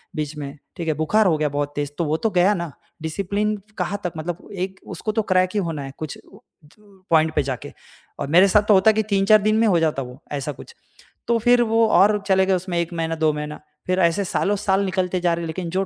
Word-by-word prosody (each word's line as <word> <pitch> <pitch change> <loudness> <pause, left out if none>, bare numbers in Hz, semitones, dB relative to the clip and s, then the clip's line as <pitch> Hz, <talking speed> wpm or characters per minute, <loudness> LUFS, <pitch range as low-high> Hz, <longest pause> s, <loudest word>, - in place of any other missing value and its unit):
बीच 150 0 -3
में, 145 0 -7 0.2
ठीक 170 -3 -5
है? 155 - +2
बुखार 200 +8 +2
हो 160 -3 +2
गया 150 -1 0
बहुत 145 +1 -3
तेज़, 145 -1 -3
तो 170 - 0
वो 155 +2 0
तो 225 - 0
गया 185 +3 +4
ना, 170 -5 -4 0.3
डिसिप्लिन 200 +6 -1 0.2
कहाँ 195 +3 -2
तक 180 - -3
मतलब 170 +3 -5
एक 190 0 -4
उसको 215 - -4
तो 220 +1 0
क्रेक 185 0 +3
ही 210 - +1
होना 165 -6 -3
है 135 - -7
कुछ 155 -2 -6
त - - -20 0.9
पॉइंट 160 -1 +3
पे - - +3
जाके। 130 -3 -5 0.5
और - - -3
मेरे 180 +6 +6
साथ 210 +2 +4
तो 210 - +6
होता 195 +3 +6
कि 220 0 0
3-4 200 +2 +5
दिन 215 +1 +2
में 225 0 +3
हो 175 -4 +3
जाता 155 -4 0
वो 125 0 -10 0.2
ऐसा 145 +1 -3
कुछ। 470 - -12 0.5
तो 235 -1 +3
फ़िर 245 +1 +4
वो 225 -1 +3
और 205 +3 +5
चले 190 -1 +4
गए 195 - +2
उसमें 180 -1 -2
1 170 +1 -2
महीना, 165 -1 -2
2 155 -1 +2
महीना, 150 0 -5 0.3
फ़िर 185 +1 +1
ऐसे 170 +3 +2
सालों 205 +3 0
साल 195 0 +1
निकलते 185 -1 -1
जा 175 -1 +2
रहे 170 0 -3
लेकिन 170 +1 -4
जो 190 +2 -1
180 Hz, 240 wpm, -22 LUFS, 155-200 Hz, 0.9 s, मेरे